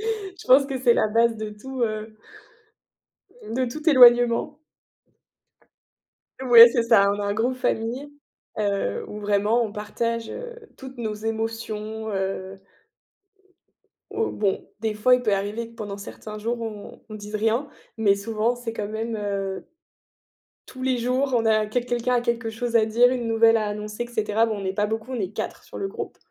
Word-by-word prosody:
Je 385 -6 -10
pense 270 +2 +7
que 270 -1 -4
c'est 245 -2 +4
la - - +2
base 230 +1 +2
de 215 -1 -5
tout, 255 +5 -7
heu 215 -1 -4 1.4
de 255 +1 0
tout 305 +7 -8
éloignement. 245 0 +6 1.8
Ouais 240 -3 +9
c'est 235 - +1
ça, 200 -4 +4
on 205 - -3
a - - -2
un 200 - 0
groupe 240 +4 0
famille, 250 +4 -2 0.5
heu, 200 - -1
où 210 - -7
vraiment 210 +3 +1
on 215 - -4
partage, 225 +2 -3
heu, 485 -1 -7 0.2
toutes 265 -1 -11
nos 220 -3 -3
émotions, 220 0 -4
heu 190 0 -4 1.5
Oh, 445 +2 0
bon, 200 -2 -1
des 220 -1 -1
fois, 250 +4 +4
il 250 - -3
peut 215 -4 +1
arriver 205 +4 -3
que 230 - -19
pendant 205 -3 -6
certains 210 +1 -9
jours 235 +3 -3
on 215 -3 -8
on 215 - -8
dise 210 0 -9
rien, 225 +6 0 0.3
mais 210 -3 +4
souvent 220 +3 -1
c'est 240 -2 -5
quand 210 -2 -4
même, 225 +1 -3
heu, 200 -2 -3 1.0
tous 255 - -11
les 260 -1 +1
jours, 255 +3 0
on 230 -1 +1
a 215 -1 +3
quel 240 +3 -2
quelqu'un 245 +1 -1
a 240 - +2
quelque 235 -1 -1
chose 230 +1 0
à 220 - +3
dire, 235 +3 +4
une 245 -3 -2
nouvelle 225 0 +4
à 215 - -1
annoncer 210 +2 -4
et - - -9
cetera. 220 -1 +1
Bon, 220 -1 -2
on - - -7
n'est 190 0 -2
pas 205 +1 +1
beaucoup, 220 +3 -4
on 250 - -3
est 195 0 -3
4 - - -5
sur - - -10
le 390 - -3
groupe. - - -7
225 Hz, 180 wpm, -24 LUFS, 210-245 Hz, 1.8 s, Ouais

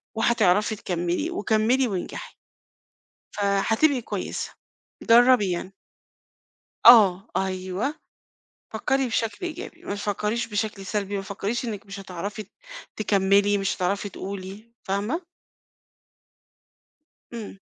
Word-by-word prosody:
وهتعرفي 215 -2 +3
تكمّلي 180 - -2
وكمّلي 250 - +2
وانجحي. 190 -4 -5 1.0
فهتبقي 220 +8 +2
كويسة، - - -4 0.5
جرّبي 235 -3 +5
يعني. 180 +2 -4 1.1
آه، 210 -4 +8
أيوه، 190 +7 -2 0.8
فكّري 265 +5 0
بشكل 230 - -2
إيجابي 350 +4 -7
ما 200 - -3
تفكريش 210 +3 -2
بشكل 210 -2 -3
سلبي 200 0 -2
متفكريش 200 +5 -3
إنِّك 215 -3 -5
مش 200 0 -8
هتعرفي 195 +3 -6
ت 200 - -27 0.4
تكمّلي 200 0 +3
مش 195 -1 -1
هتعرفي 200 +2 -1
تقولي، 200 +4 -8
فاهمة؟ 210 - -1 2.1
إمم. 215 -4 -7
205 Hz, 95 wpm, -25 LUFS, 195-230 Hz, 2.1 s, آه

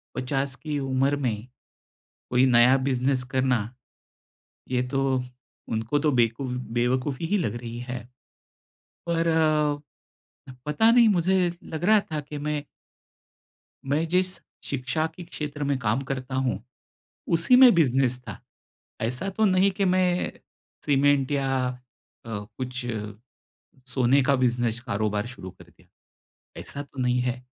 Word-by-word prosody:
50 135 +1 -1
की 150 0 -4
उम्र 135 +1 +1
में, 120 -4 -3 0.8
कोई 125 +1 +4
नया 125 +1 +6
बिज़नेस 130 0 +1
करना, 130 -2 +2 1.1
ये 125 -1 +1
तो 135 -1 0 0.5
उनको 115 +6 0
तो 150 0 +2
बेकूफ़ 120 +1 +1 0.2
बेवकूफ़ी 130 +5 0
ही 205 +3 +2
लग 170 - -1
रही 120 0 -6
है। 125 -1 -4 1.1
पर 165 0 +1
अ, 155 -2 +2 0.8
पता 150 +10 +3
नहीं 235 -1 +6
मुझे 180 -1 +2
लग 160 +1 -6
रहा 215 0 +6
था 155 - -1
कि 150 +1 -8
मैं 150 0 -2 1.2
मैं 145 +4 0
जिस 185 +1 +1 0.3
शिक्षा 140 +4 -1
के 180 - -8
क्षेत्र 150 -3 -5
में 140 -1 0
काम 115 +2 0
करता 130 0 -4
हूँ, 130 -6 -1 0.7
उसी 170 +10 +4
में 255 -2 +9
बिज़नेस 130 -5 +2
था। 115 -6 -10 0.6
ऐसा 125 +12 -1
तो 220 +3 0
नहीं 190 0 +4
कि 195 +1 -1
मैं 180 -1 +1 0.5
सीमेंट 140 -1 +3
या 135 -1 0 0.8
अ, - - -9
कुछ 120 +5 -5 1.1
सोने 130 +2 +3
का 140 +1 +3
बिज़नेस 120 -2 0
कारोबार 105 -2 -1
शुरू 120 -6 -9
कर - - -16
दिया, - - -24 0.7
ऐसा 145 - -5
तो 140 -1 -16
नहीं 125 0 +2
है। 125 0 -2
135 Hz, 135 wpm, -25 LUFS, 125-155 Hz, 1.2 s, में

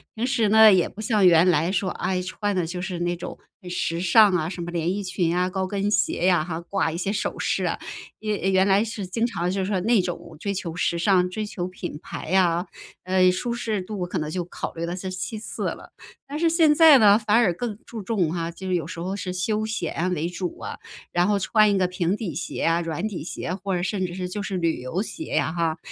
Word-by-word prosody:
平 225 - -1
时 240 -4 +1
呢， 220 0 +8
也 180 -3 +3
不 215 - -10
像 210 -4 +3
原 175 +1 +6
来 165 0 +2
说， 195 -1 0
哎， 180 +1 -2
穿 200 +2 -3
的 180 -3 0
就 180 +2 -5
是 180 -2 -4
那 175 0 -1
种 170 - -7 0.2
很 180 - -9
时 170 -1 -2
尚 205 +3 +6
啊， 160 -3 0
什 180 -2 -6
么 175 0 -5
连 170 +1 -1
衣 205 0 -3
裙 180 -2 -1
呀、 180 +2 +1
高 190 0 -2
跟 200 +1 -1
鞋 190 -3 +1
呀 180 -3 +4
哈， 165 0 -5
挂 175 -1 -1
一 - - -4
些 190 +3 -1
首 210 - -2
饰 - - 0
啊， - - -1 0.4
一 215 - -5 0.2
原 190 0 +4
来 200 +2 +4
是 215 -3 -5
经 225 +6 0
常 175 -6 -2
就 195 +1 -1
是 185 - -1
说 195 -1 0
那 225 0 +3
种 175 -2 -6
追 200 +3 -2
求 175 -3 -4
时 170 -1 0
尚、 180 0 +3
追 215 +4 -4
求 180 -4 -4
品 175 -4 -6
牌 - - -7
呀， 180 -1 +2 0.4
呃， 185 0 +4
舒 235 +6 -2
适 220 -4 -2
度 190 -1 -4
可 180 +1 -4
能 155 -1 -3
就 175 +2 -2
考 180 - -6
虑 165 0 -4
了 175 +1 -3
是 190 0 -5
其 185 +4 -4
次 220 - -6
了。 - - -9 0.4
但 285 +2 -5
是 330 +1 +3
现 320 -2 +4
在 315 -3 +8
呢， 210 -4 +6
反 215 0 +2
而 205 -7 +4
更 215 +3 -4
注 225 -3 -7
重 185 -6 0
哈， 170 -1 -3
就 190 +3 -8
是 185 - +1
有 170 - -1
时 170 - -7
候 185 +3 -3
是 185 -2 -4
休 215 +4 -1
闲 180 -4 -2
为 165 -1 -1
主 180 0 -5
啊。 - - -6 0.4
然 175 +1 +3
后 205 -1 +2
穿 215 +2 +4
一 - - +2
个 185 -1 +2
平 180 +1 -1
底 185 -10 -4
鞋 170 +1 -4
啊、 165 +1 +2
软 165 +4 -3
底 200 -7 -5
鞋 175 +1 -4
或 195 0 -4
者 175 - -1
甚 190 +1 -1
至 175 - -5
是， 180 0 -4
就 205 +2 -4
是 195 -3 -3
旅 165 -2 0
游 130 +9 -2
鞋 220 +9 -5
呀 - - +1
哈。 165 -2 0
185 Hz, 270 characters per minute, -24 LUFS, 175-205 Hz, 0.4 s, 呢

